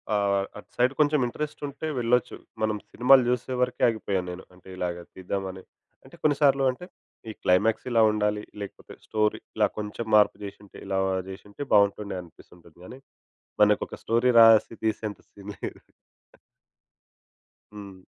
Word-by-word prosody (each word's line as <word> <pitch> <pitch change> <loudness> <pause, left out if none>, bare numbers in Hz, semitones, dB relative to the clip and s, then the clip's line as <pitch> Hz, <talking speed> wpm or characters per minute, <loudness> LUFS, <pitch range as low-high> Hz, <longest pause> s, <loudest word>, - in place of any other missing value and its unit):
ఆహ్, 100 -1 +1
అటు 105 - -13
సైడ్ 125 +2 +2
కొంచెం 150 0 +3
ఇంట్రెస్ట్ 150 +5 -6
ఉంటే 145 +3 -6
వెళ్లొచ్చు. 120 +1 +1 0.3
మనం 110 -1 0
సినిమాలు 130 +1 +5
చూసే 125 +1 -1
వరకే 125 - -1
ఆగిపోయాను 100 -5 -2
నేను. 90 +1 -9
అంటే 90 0 -20
ఇలాగా 85 -1 -3
తీద్దామని, 95 0 -5 0.4
అంటే - - -16
కొన్నిసార్లు 140 -2 +3
అంటే, 180 +8 -10 0.4
ఈ - - -3
క్లైమాక్స్ 110 +7 +2
ఇలా 115 -1 +4
ఉండాలి. 105 0 -1 0.2
లేకపోతే 100 - -9
స్టోరీ 105 -1 0 0.2
ఇలా - - +4
కొంచెం 105 +2 -5
మార్పు 105 -1 +4
చేసుంటే, 100 0 -12
ఇలా 95 0 -1 0.3
చేసుంటే 100 +6 -8
బాగుంటుండే 100 -1 +2
అనిపిస్తూ 85 0 -17
ఉంటుంది 85 -1 -21
కానీ, 130 - -11 0.6
మనకు 105 0 +4
ఒక - - -9
స్టోరీ 120 +2 +2
రాసి 115 0 +6
తీసేంత 110 -1 -2
సీన్ 100 0 -10
లేదు. - - -6 1.9
హ్మ్. 100 -2 -10
105 Hz, 140 wpm, -26 LUFS, 100-125 Hz, 1.9 s, రాసి